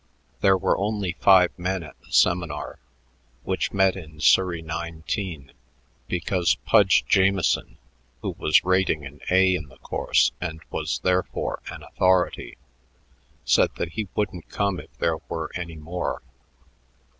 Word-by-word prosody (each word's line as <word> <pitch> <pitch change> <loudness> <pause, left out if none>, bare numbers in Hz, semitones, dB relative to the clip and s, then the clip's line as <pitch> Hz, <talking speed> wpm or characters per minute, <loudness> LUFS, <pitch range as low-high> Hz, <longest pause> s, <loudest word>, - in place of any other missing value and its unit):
There 95 -1 +4
were 95 0 +1
only 100 -2 -1
five 95 -2 +6
men 90 0 -2
at 75 - -12
the - - -21
seminar, 85 -4 +1 0.6
which - - -1
met 95 -1 +3
in 80 -5 -11
Surrey 85 +1 +3
19, 80 -1 -5 0.6
because 90 0 +1
Pudge 100 -4 +4
Jamieson, 95 -2 +2 0.5
who - - -1
was 75 - +3
"rating" 95 -5 +1
an 70 +2 -11
A 95 0 +4
in 80 -5 -3
the 65 -1 -18
course - - +1
and 80 -2 -4
was - - -2
therefore 90 0 -1
an - - -9
authority, 95 -1 0 0.9
said - - +3
that 85 - -3
he 110 +3 -4
wouldn't 95 -5 -3
come 100 -3 -1
if - - -12
there 80 -1 0
were 80 -1 -4
any 85 -2 -5
more. 80 +4 -4
90 Hz, 135 wpm, -24 LUFS, 80-95 Hz, 0.9 s, five